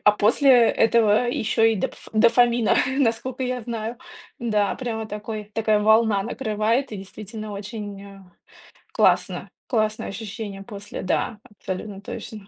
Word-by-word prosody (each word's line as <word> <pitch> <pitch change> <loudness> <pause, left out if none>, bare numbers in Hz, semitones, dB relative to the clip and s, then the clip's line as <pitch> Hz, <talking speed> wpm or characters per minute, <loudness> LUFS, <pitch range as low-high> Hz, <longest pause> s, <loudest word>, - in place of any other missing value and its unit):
а 210 - +7
после 225 +7 +3 0.2
этого 225 0 +3
ещё 225 -2 0
и 225 -1 +4
допф 185 - -5
дофамина, 235 +1 +4 0.2
наскока 250 0 0
я 250 -1 -2
знаю. 230 0 -4 0.4
Да, 210 -4 +1
прямо 225 -3 -4
такой 210 0 -6
такая 215 -1 +2
волна 220 -1 +4
накрывает 225 +2 -1
и - - -4
действительно 215 +2 -8
очень, 205 -1 -7
а, 195 -2 -14 0.6
классно, - - +2 0.2
классное 215 -3 0
ощущение 205 -1 -6
после, 205 -1 -8
да, 205 +4 -1
абсолютно 195 0 -7
точно. 205 0 -8
215 Hz, 130 wpm, -23 LUFS, 205-230 Hz, 0.6 s, а